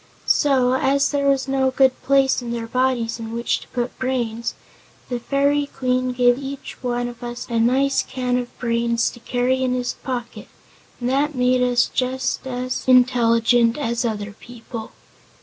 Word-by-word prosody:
So, 260 Hz, -3 st, +3 dB
as 275 Hz, +2 st, +2 dB
there 280 Hz, -1 st, 0 dB
was 275 Hz, -1 st, +2 dB
no 270 Hz, -1 st, +2 dB
good 260 Hz, 0 st, +4 dB
place 270 Hz, -1 st, +3 dB
in 240 Hz, -1 st, -5 dB
their 235 Hz, -1 st, -3 dB
bodies 240 Hz, -1 st, 0 dB
in 225 Hz, 0 st, -6 dB
which 235 Hz, +1 st, 0 dB
to -, -, -14 dB
put 245 Hz, -1 st, -3 dB
brains 235 Hz, -3 st, -2 dB, 0.5 s
the 245 Hz, -1 st, -2 dB
Fairy 280 Hz, +3 st, +1 dB
Queen 255 Hz, -1 st, -1 dB
gave 245 Hz, 0 st, +3 dB
each 275 Hz, 0 st, -7 dB
one 245 Hz, -1 st, -1 dB
of 240 Hz, 0 st, -9 dB
us 240 Hz, +1 st, -5 dB
a 230 Hz, -, +1 dB
nice 265 Hz, +4 st, +3 dB
can 250 Hz, -1 st, -2 dB
of 245 Hz, -1 st, -7 dB
brains 235 Hz, -1 st, 0 dB
to 240 Hz, -, -13 dB
carry 250 Hz, +2 st, 0 dB
in 255 Hz, -1 st, +1 dB
his 245 Hz, -1 st, -2 dB
pocket 245 Hz, -2 st, -6 dB, 0.5 s
and 245 Hz, -, -2 dB
that 280 Hz, +3 st, +1 dB
made 250 Hz, 0 st, +2 dB
us 245 Hz, -1 st, +3 dB
just 260 Hz, +1 st, -2 dB
as 255 Hz, 0 st, -3 dB
intelligent 240 Hz, -1 st, +4 dB
as 235 Hz, -4 st, -1 dB
other 210 Hz, -3 st, -3 dB
people. 230 Hz, +1 st, -9 dB
250 Hz, 165 wpm, -21 LUFS, 235-260 Hz, 0.5 s, good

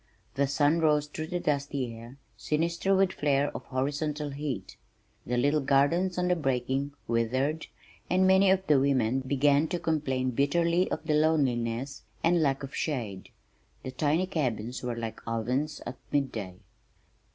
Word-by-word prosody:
The 140 Hz, 0 st, +1 dB
sun 145 Hz, +3 st, +2 dB
rose 150 Hz, -2 st, +3 dB
through 155 Hz, +1 st, -6 dB
the 175 Hz, +1 st, -2 dB
dusty 140 Hz, -5 st, -1 dB
air, 115 Hz, +4 st, -11 dB, 0.2 s
sinister 170 Hz, +5 st, 0 dB
with 190 Hz, -1 st, +3 dB
flare 145 Hz, -1 st, +1 dB
of 125 Hz, -, -6 dB
horizontal 145 Hz, +2 st, -2 dB
heat. 140 Hz, -1 st, -5 dB, 0.5 s
The 125 Hz, +1 st, 0 dB
little 145 Hz, +4 st, +2 dB
gardens 155 Hz, +7 st, +2 dB
on 180 Hz, 0 st, +1 dB
the 180 Hz, -, +3 dB
breaking 135 Hz, -1 st, -1 dB
withered, 130 Hz, +7 st, 0 dB, 0.4 s
and 185 Hz, +1 st, +3 dB
many 190 Hz, +1 st, +5 dB
of 190 Hz, 0 st, +2 dB
the 150 Hz, -5 st, +4 dB
women 130 Hz, -3 st, +2 dB
began 140 Hz, +3 st, +2 dB
to 175 Hz, -, -2 dB
complain 140 Hz, -6 st, -1 dB
bitterly 170 Hz, +7 st, +2 dB
of 160 Hz, -, -4 dB
the 155 Hz, -, +1 dB
loneliness, 135 Hz, -4 st, +1 dB, 0.2 s
and 170 Hz, 0 st, +3 dB
lack 140 Hz, -2 st, +1 dB
of 135 Hz, -, -7 dB
shade. 115 Hz, -, -3 dB, 0.5 s
The 130 Hz, -, -5 dB
tiny 150 Hz, +7 st, +1 dB
cabins 125 Hz, -, -2 dB
were 125 Hz, -1 st, -3 dB
like 115 Hz, -1 st, -5 dB
ovens 125 Hz, +7 st, -2 dB
at 125 Hz, -, -6 dB
mid 140 Hz, -2 st, +1 dB
day. 95 Hz, -5 st, -6 dB
140 Hz, 155 wpm, -28 LUFS, 130-160 Hz, 0.5 s, many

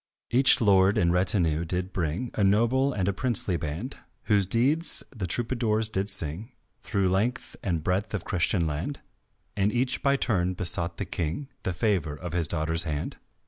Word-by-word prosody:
Each 130 Hz, +3 st, +5 dB
lord 100 Hz, -3 st, +4 dB
in 85 Hz, -1 st, +2 dB
retinue 90 Hz, -3 st, +1 dB
did 90 Hz, +2 st, -3 dB
bring 90 Hz, +8 st, -3 dB
A 105 Hz, -, 0 dB
noble 120 Hz, +7 st, +2 dB
and 95 Hz, -7 st, -2 dB
a 100 Hz, -, +1 dB
princely 110 Hz, -5 st, 0 dB
band, 85 Hz, -, -5 dB, 0.3 s
Whose 100 Hz, -4 st, +2 dB
deeds 140 Hz, -, +2 dB
the 100 Hz, -5 st, -4 dB
troubadours 110 Hz, 0 st, 0 dB
did 100 Hz, -1 st, +1 dB
sing 90 Hz, -, +2 dB, 0.3 s
Through 100 Hz, -4 st, 0 dB
length 110 Hz, +7 st, -1 dB
and 85 Hz, -5 st, -2 dB
breadth 100 Hz, +5 st, -1 dB
of 100 Hz, -, -5 dB
Christian 90 Hz, -1 st, 0 dB
land, 80 Hz, -, -4 dB, 0.5 s
And 100 Hz, +1 st, +1 dB
each 125 Hz, +2 st, -1 dB
by 140 Hz, 0 st, +2 dB
turn 95 Hz, -9 st, 0 dB
besought 85 Hz, -1 st, -2 dB
the 100 Hz, -, -3 dB
King 90 Hz, -, -4 dB
The 95 Hz, -, -3 dB
favour 90 Hz, -6 st, -1 dB
of 85 Hz, +2 st, -7 dB
his 85 Hz, -3 st, +1 dB
daughter's 80 Hz, +1 st, +2 dB
hand. 75 Hz, -2 st, -4 dB
95 Hz, 170 wpm, -26 LUFS, 85-115 Hz, 0.5 s, Each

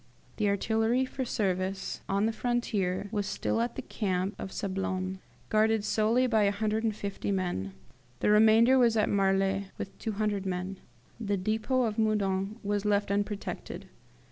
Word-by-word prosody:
"The 210 Hz, -1 st, +2 dB
artillery 225 Hz, +5 st, +1 dB
for 260 Hz, +1 st, -4 dB
service 190 Hz, -3 st, -2 dB
on 200 Hz, +2 st, +2 dB
the 225 Hz, -, +2 dB
frontier 210 Hz, -6 st, -1 dB
was 205 Hz, -3 st, -1 dB
still 230 Hz, -, -1 dB
at 235 Hz, 0 st, -2 dB
the 265 Hz, -, -5 dB
camp 190 Hz, -3 st, -1 dB
of 190 Hz, -, -5 dB
Sablons, 190 Hz, -1 st, -3 dB, 0.3 s
guarded 220 Hz, 0 st, +3 dB
solely 220 Hz, +4 st, +2 dB
by 220 Hz, -4 st, +3 dB
150 210 Hz, 0 st, -1 dB
men; 175 Hz, -, -2 dB, 0.5 s
the -, -, +2 dB
remainder 220 Hz, +4 st, +6 dB
was 230 Hz, -2 st, +4 dB
at 215 Hz, -, +2 dB
Marly 195 Hz, 0 st, +1 dB
with 195 Hz, -, -6 dB
200 210 Hz, -2 st, -1 dB
men. 185 Hz, 0 st, -3 dB, 0.4 s
The 205 Hz, -3 st, -1 dB
depot 220 Hz, +6 st, 0 dB
of 220 Hz, -1 st, -1 dB
Meudon 200 Hz, -2 st, +1 dB
was 205 Hz, 0 st, -1 dB
left 205 Hz, -1 st, +1 dB
unprotected. 205 Hz, 0 st, -3 dB
205 Hz, 145 wpm, -29 LUFS, 195-220 Hz, 0.5 s, remainder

